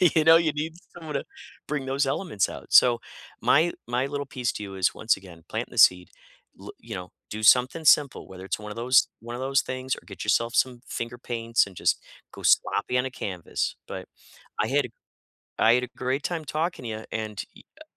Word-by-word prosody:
You 160 - +5
know, 160 0 +9
you 165 -2 +2
need 155 +2 -3 0.2
someone 160 -3 -8
to 140 - -1 0.4
bring 145 -3 -2
those 135 +1 +1
elements 135 - 0
out. - - -9
So 120 -2 +7 0.4
my 165 +4 +4 0.2
my 125 +2 0
little 145 0 -4
piece 125 -3 -2
to 105 - -6
you 100 -1 -7
is 95 -1 +1
once 110 - +1
again, 90 -4 -14
planting - - -3
the - - -11
seed, 90 0 +6 0.5
lo - - -10
you 115 -2 -8
know, 90 -1 -7 0.2
do 110 +1 -6
something 130 +8 +5
simple, 145 -2 +4
whether 95 0 -10
it's 95 - -2
one 105 0 -8
of - - -7
those 125 +2 +4
one 120 +1 -7
of 125 - -6
those 135 0 +2
things 130 0 -3
or - - -12
get 100 - -8
yourself 115 +3 +2
some 125 -2 +1
finger 120 +1 -5
paints 115 -2 0
and 95 - -14
just - - +1 0.3
go - - -10
sloppy 125 - +2
on 125 - +1
a 130 - -4
canvas. 95 -8 -3
But - - -7 0.5
I - - +1
had - - +2
a - - -13 0.7
I 115 +2 +6
had 125 - +2
a - - -8
great 130 +3 -1
time 165 -3 -2
talking 155 0 -2
to - - -4
ya, 110 0 -6
and, 110 -4 -3
ee - - -14 0.2
a - - -11
125 Hz, 220 wpm, -26 LUFS, 110-140 Hz, 0.7 s, know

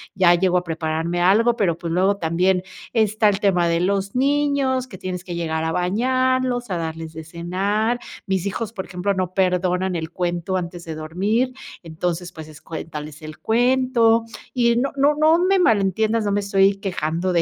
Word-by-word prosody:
ya 185 -2 +5
llego 180 +1 +2
a 180 - 0
prepararme 165 +1 -2
algo, 225 +6 +4
pero 175 -6 +1
pues 170 -1 -5
luego 190 +4 +2
también 180 +2 +1 0.3
está 215 -1 +2
el 200 -1 +2
tema 180 -4 +3
de 170 0 +1
los 195 +2 -1
niños, 275 -1 +1
que 195 - -10
tienes 180 0 -5
que 175 -2 -5
llegar 160 -1 -2
a 160 - -1
bañarlos, 250 +6 0
a 175 - 0
darles 160 -1 -5
de 160 0 -8
cenar, 195 +8 -1 0.3
mis 190 -1 -1
hijos, 210 +2 -3
por 195 -5 -6
ejemplo, 190 +2 -2
no 185 -1 -2
perdonan 180 0 +1
el 160 -1 -4
cuento 175 +1 -2
antes 175 -1 -4
de 160 -1 -5
dormir, 200 +11 -1 0.3
entonces 175 +2 -3
pues 160 -2 -10
es 155 0 -14
cuéntales 150 -2 -7
el 155 0 -9
cuento 240 -1 +3 0.3
y 235 -2 +2
no 270 +3 0
no 285 +2 +3
no 310 +2 +4
me 380 +2 +3
malentiendas, 220 - +2
no 205 - 0
me 205 - +1
estoy 195 0 +2
quejando 180 -2 -2
de 170 - +3
190 Hz, 185 wpm, -22 LUFS, 170-230 Hz, 0.3 s, ya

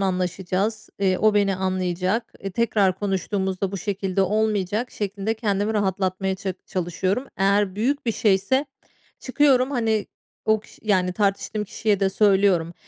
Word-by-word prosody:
anlaşacağız, 190 +3 -1
eee, 190 -2 +2
o 215 -1 +3
beni 200 -2 +2
anlayacak, 185 +3 -1 0.2
tekrar 205 -5 +2
konuştuğumuzda 190 -1 -1
bu - - -2
şekilde 195 0 -1
olmayacak." 210 +2 0
şeklinde 205 +1 -3
kendimi 210 -1 -1
rahatlatmaya 190 -1 0
ça 190 -2 -4
çalışıyorum. 185 +6 -1
Eğer 195 0 +2
büyük 255 +5 -1
bir 230 - +2
şeyse 210 +8 +2 0.5
çıkıyorum, 260 -1 +3
hani, 225 -5 0 0.4
o 220 -1 +3
kiş - - -18
yani 185 -4 +1
tartıştığım 205 +1 -1
kişiye 205 0 -1
de 195 -1 +2
söylüyorum. 190 -5 +3
200 Hz, 130 wpm, -23 LUFS, 190-215 Hz, 0.5 s, o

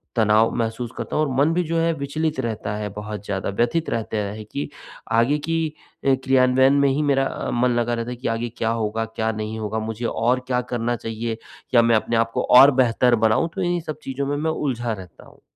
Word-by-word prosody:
तनाव 110 0 +4
महसूस 115 0 -2
करता - - -4
हूँ 155 - +3
और - - -3
मन 145 +3 +4
भी 180 - +1
जो 165 - 0
है 165 0 +2
विचलित 155 +1 -2
रहता 110 -4 -3
है 105 -1 -3
बहुत 105 -1 -6
ज़्यादा 95 -1 -2
व्यथित 120 +11 0
रहता 110 -1 -2
है 105 +1 -4
कि 140 +8 -5 0.4
आगे 115 +6 +3
की 165 0 +1 0.5
अ, 135 - +5
क्रियान्वयन 130 0 +4
में 140 - +4
ही 135 +3 0
मेरा 140 -2 +2
अ, - - -4
मन 125 +1 +2
लगा 120 0 0
रहता 115 +1 -3
है 125 - -4
कि 125 - -4
आगे 120 +1 -3
क्या 115 - 0
होगा 110 +1 -1
क्या 110 0 -2
नहीं 110 +1 -5
होगा 110 +1 -2
मुझे 110 +2 -4
और 120 +3 +1
क्या 125 -1 +1
करना 120 0 0
चाहिए, 115 0 -4 0.4
या 120 - +7
मैं 115 0 +3
अपने 115 +2 0
आप 115 0 +1
को - - 0 0.2
और 140 +2 +9
बेहतर 120 0 +3
बनाऊँ, 110 +10 +2
तो 195 - -2
इन्हीं 175 -1 0
सब 155 -2 -6
चीज़ों 135 +1 -3
में 145 0 -1
मैं 160 +2 0
उलझा 120 -6 -2
रहता 95 -4 -11
हूँ। - - -20
120 Hz, 230 wpm, -22 LUFS, 110-140 Hz, 0.5 s, और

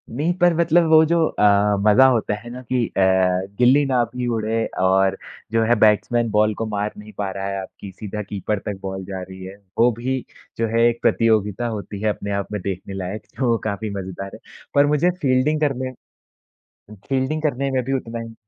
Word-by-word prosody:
नहीं 150 +8 -1
पर 175 -1 +4
मतलब 170 0 +3
वो 160 0 +7
जो 165 0 +2
अ, - - -2 0.4
मज़ा 110 +5 +6
होता 115 -4 0
है 120 +3 -11
ना 125 +1 -8
कि 125 -1 -1
अ, - - -5 0.6
गिल्ली 130 +4 +5
ना 130 -3 +2
भी 125 -1 -2
उड़े 110 +1 -1 0.2
और 95 +1 +3 0.3
जो 115 0 +2
है 120 +2 +3
बैट्समैन 115 +2 +3
बॉल 105 +1 +3
को - - 0
मार 105 0 -2
नहीं 105 +1 -11
पा 100 -2 -2
रहा 95 +1 -4
है 100 0 -3
आपकी 95 +1 -10
सीधा 105 +2 -6
कीपर 105 +1 -3
तक 100 -2 -4
बॉल 95 -1 -5
जा 95 -1 -6
रही 95 0 -9
है, 95 +1 -8 0.2
वो 120 +2 +5
भी 130 +2 -1 0.4
जो 115 - 0
है 115 +1 +1
एक 120 0 -1
प्रतियोगिता 110 0 +2
होती 105 -2 -5
है 110 - +1
अपने 100 -1 -4
आप 100 0 -3
में 105 -2 -3
देखने 95 +1 -5
लायक, 95 +2 -5
जो 120 -3 +1
काफ़ी 110 0 -3
मज़ेदार 95 +1 -7
है। - - -13 0.4
पर 140 0 +6
मुझे 150 +4 +2
फील्डिंग 135 +3 +2
करने 130 -3 -1 1.2
फील्डिंग 135 +4 -1
करने 140 -2 0
में 130 -1 0
भी 135 - -3
उतना 120 -3 -3
ही 115 0 -8
115 Hz, 200 wpm, -21 LUFS, 100-130 Hz, 1.2 s, वो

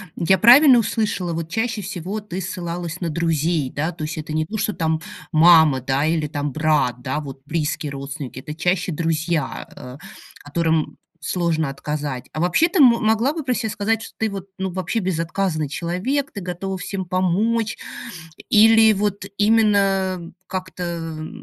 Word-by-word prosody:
Я 190 +3 +3
правильно 250 - +8
услышала, 210 -6 -1
вот, 165 0 -4
чаще 225 +2 -1
всего 195 +2 -5
ты 190 -2 -6
ссылалась 175 -1 -5
на 170 - -1
друзей, 160 -2 0
да? 155 +6 -2
То 160 -2 -8
есть 160 +1 -5
это 155 0 -5
не 155 0 0
то, 220 +6 -5
что 210 - -1
там 160 -2 -1 0.3
мама, 160 -4 +6
да, 135 +3 0
или 160 -2 0
там 145 -1 -3
брат, 150 -5 +1
да, 135 +3 -2
вот 135 -2 -8
близкие 150 -1 -2
родственники- 140 -1 -6
это 150 +3 -8
чаще 180 +1 0
друзья, 165 -1 -2
э, 125 +2 -10 0.5
которым 160 +1 0 0.2
сложно 165 -4 0
отказать. 140 -2 -5
А 155 - -5
вообще, 180 - +3
ты 365 - 0
могла 235 +1 +4
бы 320 -3 -4
про 255 - 0
себя 225 -2 -2
сказать, 220 +2 -1
что - - -10
ты, 220 -1 0
вот, 195 -1 -6
ну, 190 -1 -3
вообще 190 +5 -2
безотказный 170 -3 -1
человек, 185 - -2
ты 200 - -6
готова 185 +1 -4
всем 190 +1 -4
помочь? 205 +6 0 0.7
Или 220 0 +6
вот 200 -1 -2
именно, 200 -3 +3
э, 170 - -10 0.2
как-то, 170 -4 -5
175 Hz, 160 wpm, -21 LUFS, 155-205 Hz, 0.7 s, правильно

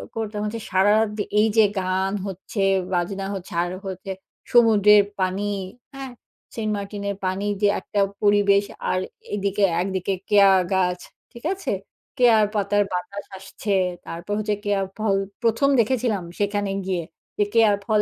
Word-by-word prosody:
করতাম 215 -2 -3
হচ্ছে 225 +2 -4
সারারাত 205 +3 +3
যে 205 - +1 0.2
এই 215 - +5
যে 220 - +7
গান 190 +1 -1
হচ্ছে 195 +2 -5 0.3
,বাজনা 190 +2 -1
হচ্ছে, 190 -2 -8
আর 175 - -4 0.2
হচ্ছে 190 +1 -6 0.4
সমুদ্রের 210 -3 +6 0.2
পানি, 185 +2 0 0.5
হ্যাঁ? 270 -2 -7 0.4
সেন্ট 215 -2 -2
মার্টিনের 200 0 -4
পানি 190 +2 -1 0.2
যে 205 - +5
একটা 205 - -3 0.2
পরিবেশ, 205 -1 +4 0.3
আর 185 - +1 0.4
এদিকে 200 0 -1 0.2
একদিকে 190 0 -1 0.2
কেয়া 200 -2 +6 0.2
গাছ। 180 -1 +1 0.3
ঠিক 235 -1 -13
আছে? 390 - -4 0.5
কেয়া 240 -3 +6 0.2
পাতার 205 0 +2
বাতাস 180 +3 -4
আসছে 195 +2 -4 0.3
তারপর 175 +5 -5
হচ্ছে 210 0 0
কেয়ার 200 -1 +1
ফল 215 -2 +1 0.3
প্রথম 230 +5 +3
দেখেছিলাম 230 -4 +1 0.2
সেখানে 205 -1 0
গিয়ে। 185 -3 -1 0.3
যে 210 - +3
কেয়ার 225 -3 +5
ফল 215 0 +3
205 Hz, 145 wpm, -23 LUFS, 190-215 Hz, 0.5 s, যে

